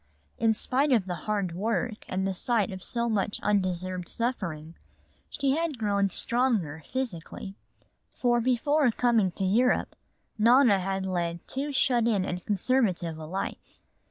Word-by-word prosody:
In 225 Hz, -1 st, +3 dB
spite 275 Hz, +6 st, +2 dB
of 225 Hz, -7 st, +3 dB
the 180 Hz, -, -3 dB, 0.2 s
hard 200 Hz, -4 st, 0 dB
work 215 Hz, +4 st, -2 dB
and 190 Hz, +1 st, -1 dB
the 195 Hz, -, -1 dB
sight 215 Hz, +1 st, 0 dB
of 185 Hz, -1 st, -7 dB
so 235 Hz, -1 st, -1 dB
much 210 Hz, -2 st, -1 dB
undeserved 185 Hz, -3 st, -1 dB
suffering, 170 Hz, -10 st, -3 dB, 0.6 s
she 280 Hz, -2 st, 0 dB
had 325 Hz, -4 st, -1 dB
grown 200 Hz, -3 st, +1 dB
stronger 210 Hz, -, 0 dB
physically. 200 Hz, -6 st, -4 dB, 0.6 s
For 240 Hz, -1 st, +2 dB
before 260 Hz, +4 st, +2 dB
coming 230 Hz, -4 st, +2 dB
to 195 Hz, -, -2 dB
Europe 240 Hz, +7 st, +2 dB, 0.4 s
Nona 235 Hz, -2 st, +5 dB
had 190 Hz, +1 st, -2 dB
led 170 Hz, -2 st, -3 dB
too 280 Hz, +2 st, -3 dB
shut 250 Hz, -4 st, +2 dB
in 200 Hz, -5 st, +1 dB
and 180 Hz, -1 st, -4 dB
conservative 195 Hz, -6 st, +1 dB
a 155 Hz, -, -7 dB
life. 190 Hz, +4 st, -5 dB
210 Hz, 145 wpm, -27 LUFS, 185-245 Hz, 0.6 s, Nona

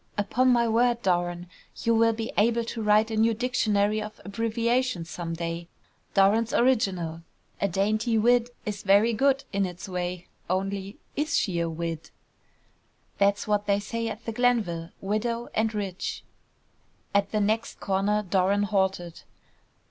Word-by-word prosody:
"Upon 220 Hz, +5 st, +1 dB
my 235 Hz, -1 st, +3 dB
word, 235 Hz, +1 st, +2 dB
Doran, 175 Hz, -1 st, 0 dB, 0.4 s
you 230 Hz, -, +3 dB
will 230 Hz, 0 st, +4 dB
be 225 Hz, 0 st, -4 dB
able 230 Hz, +2 st, +3 dB
to 230 Hz, 0 st, -5 dB
write 215 Hz, +1 st, +3 dB
a -, -, -1 dB
new 225 Hz, +1 st, +3 dB
dictionary 215 Hz, -3 st, +1 dB
of 210 Hz, 0 st, -8 dB
abbreviations 230 Hz, -2 st, -1 dB
some 165 Hz, -1 st, -4 dB
day! 170 Hz, 0 st, -4 dB, 0.5 s
Doran's 210 Hz, +4 st, +3 dB
Original! 185 Hz, -10 st, +1 dB, 0.4 s
A 200 Hz, -, +3 dB
dainty 215 Hz, +5 st, +1 dB
wid. 240 Hz, +2 st, +3 dB, 0.2 s
is 205 Hz, -1 st, -4 dB
very 205 Hz, +4 st, +4 dB
good 275 Hz, +4 st, +2 dB
in 200 Hz, 0 st, +1 dB
its 180 Hz, 0 st, -5 dB
way; 180 Hz, -1 st, -4 dB, 0.2 s
only, 195 Hz, +2 st, -2 dB, 0.2 s
is 305 Hz, +2 st, 0 dB
she 180 Hz, -5 st, 0 dB
a 170 Hz, 0 st, 0 dB
'wid.'?" 165 Hz, 0 st, -4 dB, 1.1 s
"That's 200 Hz, +1 st, +2 dB
what 210 Hz, -1 st, 0 dB
they 200 Hz, 0 st, +3 dB
say 230 Hz, +3 st, -3 dB
at 225 Hz, +1 st, -6 dB
the 230 Hz, -, -2 dB
Glenville. 215 Hz, -9 st, 0 dB
Widow 230 Hz, +4 st, -2 dB
and 220 Hz, 0 st, +1 dB
rich." 200 Hz, -4 st, -4 dB, 0.9 s
At 200 Hz, -1 st, +2 dB
the 215 Hz, -, +1 dB
next 220 Hz, +2 st, -1 dB
corner 200 Hz, +2 st, 0 dB
Doran 195 Hz, +1 st, +2 dB
halted. 190 Hz, -4 st, -1 dB
210 Hz, 150 wpm, -26 LUFS, 190-230 Hz, 1.1 s, will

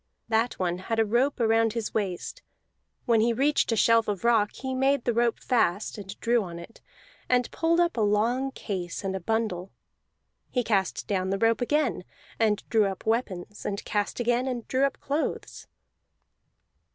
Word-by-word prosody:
That 225 Hz, +2 st, +2 dB
one 180 Hz, -1 st, -1 dB
had 225 Hz, +4 st, -3 dB
a 225 Hz, -, +3 dB
rope 250 Hz, +6 st, +1 dB
around 225 Hz, -1 st, +3 dB
his 230 Hz, -2 st, -3 dB
waist; 195 Hz, -5 st, -3 dB, 0.6 s
when 230 Hz, -3 st, +4 dB
he 235 Hz, +1 st, +3 dB
reached 280 Hz, +2 st, +2 dB
a -, -, +2 dB
shelf 230 Hz, +1 st, +4 dB
of 205 Hz, -1 st, -2 dB
rock 225 Hz, -3 st, +3 dB
he 260 Hz, 0 st, -5 dB
made 270 Hz, 0 st, +1 dB
the 240 Hz, -, +2 dB
rope 235 Hz, 0 st, +1 dB
fast, 215 Hz, -5 st, 0 dB
and 195 Hz, 0 st, -9 dB
drew 235 Hz, 0 st, +2 dB
on 175 Hz, -4 st, -6 dB
it, 170 Hz, +7 st, -12 dB, 0.5 s
and 250 Hz, -1 st, +2 dB
pulled 335 Hz, +1 st, +1 dB
up 345 Hz, -5 st, +2 dB
a -, -, +1 dB
long 225 Hz, +6 st, +1 dB
case 185 Hz, -9 st, -5 dB
and 190 Hz, 0 st, -2 dB
a -, -, -2 dB
bundle: 195 Hz, -2 st, -2 dB, 0.8 s
he 250 Hz, -, 0 dB
cast 200 Hz, -4 st, 0 dB
down 190 Hz, -2 st, -1 dB
the 195 Hz, -, 0 dB
rope 225 Hz, +3 st, +2 dB
again, 300 Hz, +5 st, 0 dB, 0.4 s
and 215 Hz, -2 st, +1 dB
drew 220 Hz, -3 st, +3 dB
up 190 Hz, -1 st, -6 dB
weapons, 210 Hz, -4 st, -2 dB
and 200 Hz, 0 st, -4 dB
cast 205 Hz, +2 st, -2 dB
again, 240 Hz, +2 st, +1 dB
and 245 Hz, -3 st, -4 dB
drew 265 Hz, +1 st, +2 dB
up 275 Hz, -, -3 dB
clothes. 290 Hz, +3 st, -3 dB
225 Hz, 175 wpm, -27 LUFS, 205-245 Hz, 0.8 s, when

